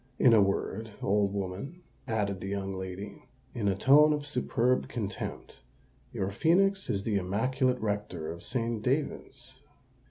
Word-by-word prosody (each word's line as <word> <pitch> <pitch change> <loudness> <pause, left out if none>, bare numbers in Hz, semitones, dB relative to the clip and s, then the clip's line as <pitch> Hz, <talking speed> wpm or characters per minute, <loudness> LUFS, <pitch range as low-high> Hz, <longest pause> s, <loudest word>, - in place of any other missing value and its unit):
In 125 - +6
a 110 - +7
word, 100 +2 -1
old 100 0 +2
woman," 100 - -5 0.2
added 100 -4 -1
the - - -5
young 100 -1 -3
lady, 95 +2 -6 0.3
in 115 -5 -1
a 95 - +2
tone 150 +7 +6
of 145 -1 -3
superb 130 -3 +1
contempt, 105 -4 -5 0.5
"your 95 - -2
phœnix 190 - +2
is 100 -1 -1
the 105 -2 0
immaculate 125 +7 +1
rector 105 -7 -3
of 85 +1 -8
St. 115 -3 -2
David's!" 130 -1 -3
110 Hz, 145 wpm, -29 LUFS, 100-130 Hz, 0.5 s, a